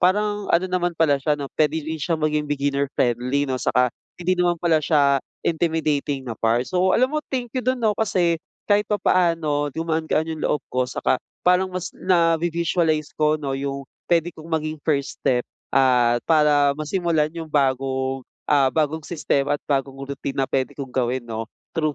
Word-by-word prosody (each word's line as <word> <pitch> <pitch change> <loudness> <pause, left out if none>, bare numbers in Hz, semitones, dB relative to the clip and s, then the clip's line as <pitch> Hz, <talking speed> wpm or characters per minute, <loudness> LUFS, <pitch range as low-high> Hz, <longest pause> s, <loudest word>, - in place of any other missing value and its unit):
parang 205 +2 +1
ano 170 +2 +3
naman 175 -2 -1
pala 145 -4 +3
siya 150 +2 +1
'no, 140 - -5
puwede 155 0 +2
din 160 0 -4
siya 165 +2 0
maging 150 -1 0
beginner 140 -1 0
friendly 125 +4 +1
'no. 130 -2 -2
Saka 125 0 +2 0.2
hindi 180 +1 0
naman 175 -1 +2
pala 165 -2 +2
siya 140 -3 +3 0.2
intimidating 155 -4 0
na 120 - -4
part. 115 +2 +2
So 185 +4 +2
alam 255 +4 +2
mo, 305 - 0
thank 245 -3 -3
you 255 - -1
do'n 255 +1 0
'no 215 - +4
kasi 180 -6 +1 0.3
kahit 205 0 +4
papaano 165 -7 +1
gumaan-gaan 160 +1 -1
yung 160 -1 -5
loob 150 - +1 0.2
ko 125 0 0
saka 130 - 0 0.2
parang 185 +1 +4
mas 185 -1 -5
navi-visualize 165 -2 +1
ko 155 0 +2
'no 140 -3 -3
yung 140 0 -4 0.2
puwede 170 0 +2
kong 160 +1 -12
maging 155 -1 -1
first 140 -3 -1
step 125 -1 +1 0.2
at 125 -3 +4
para 150 -3 +4
masimulan 155 0 0
yung 165 -1 -7
bagong, 135 -2 0 0.2
ah, 140 -2 +5
bagong 155 0 0
sistema 145 -3 0
at - - -5
bagong 135 -1 0
routine 140 0 -5
na 135 -1 -1
puwede 130 -1 -1
kong 135 -2 -6
gawin 125 0 -1
'no 115 -1 -5 0.3
through 155 -2 +1
155 Hz, 175 wpm, -23 LUFS, 140-170 Hz, 0.3 s, ah